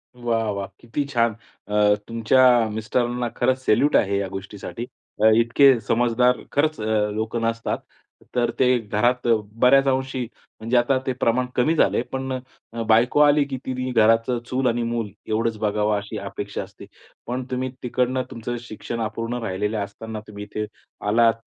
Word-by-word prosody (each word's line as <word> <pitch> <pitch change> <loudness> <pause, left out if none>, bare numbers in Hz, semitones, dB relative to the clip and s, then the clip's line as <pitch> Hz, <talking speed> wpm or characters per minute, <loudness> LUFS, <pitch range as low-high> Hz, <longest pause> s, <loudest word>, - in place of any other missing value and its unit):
वाह 115 -3 -1
वाह! 100 -1 -4
किती 120 +5 -3
छान. 115 -2 +2 0.3
अ, 105 0 +4
तुमच्या 120 +1 +4
मिस्टरांना 120 +3 -1
खरंच 130 0 0
सॅल्यूट 145 +7 +3
आहे. 100 0 +3
या 100 - -2
गोष्टीसाठी 100 +4 -7 0.5
इतके 125 +2 +5
समजदार 120 +2 +2
खरंच 155 +2 +1 0.3
लोक 110 +2 -3
नसतात 115 0 -1 0.6
तर 120 -1 +2
ते 130 - +4
घरात 120 +3 0 0.3
बऱ्याच 135 +2 +6
अंशी 130 0 0 0.4
म्हणजे 115 +3 +1
आता 120 +3 +3
ते 130 - 0
प्रमाण 125 0 +1
कमी 155 +7 +2
झाले. 150 - +3
पण 130 +1 -4 0.5
बायको 115 +5 +4
आली, 145 0 +5
की 135 -2 -5
ती 130 0 -3
घराचं 115 +1 +3
चूल 130 0 0
आणि 120 0 +1
मूल 115 -2 -2 0.2
एवढंच 110 +1 0
बघावं 105 0 +1
अशी 105 +2 -6
अपेक्षा 100 0 -5
असते, - - -13 0.4
पण 125 +2 -2
तुम्ही 130 +1 -1
तिकडनं 125 +1 0
तुमचं 120 +1 -4
शिक्षण 115 0 -6
अपूर्ण 115 +2 -3
राहिलेले 105 +2 -2
असताना 110 +2 -5
तुम्ही 105 -1 -8
इथे 105 +1 -4 0.4
आलात, 115 +2 +4
115 Hz, 150 wpm, -23 LUFS, 110-125 Hz, 0.6 s, बऱ्याच